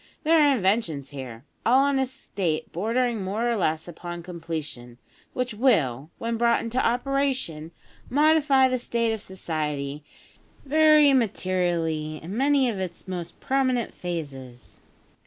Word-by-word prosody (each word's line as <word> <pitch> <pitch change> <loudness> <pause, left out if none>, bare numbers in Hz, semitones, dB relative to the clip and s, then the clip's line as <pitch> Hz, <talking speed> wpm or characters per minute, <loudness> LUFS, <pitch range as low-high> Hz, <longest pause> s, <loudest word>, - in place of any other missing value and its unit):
There 325 +1 +4
are 290 -2 +5
inventions 185 - 0
here, 130 -3 -8 0.2
all 260 +4 +4
in 280 -1 +1
a 265 - +1
state 185 -10 -3
bordering 230 +3 0
more 210 +5 -1
or 235 - +1
less 160 -5 -1
upon 175 0 -7
completion, 160 -8 -6 0.4
which 250 -2 -2
will, 155 - +1
when 230 0 -2
brought 235 0 +3
into 230 +3 -1
operation, 250 - -1 0.4
modify 290 -1 +4
the 255 -1 -1
state 230 -1 0
of 220 - -5
society 150 -6 -4 0.6
very 305 0 +5
materially 175 -9 0
in 180 +6 -7
many 275 +1 +3
of 215 -5 -2
its 180 -1 -6
most 175 -2 -6
prominent 260 -3 0
phases. 135 -8 -7
200 Hz, 135 wpm, -25 LUFS, 160-255 Hz, 0.6 s, are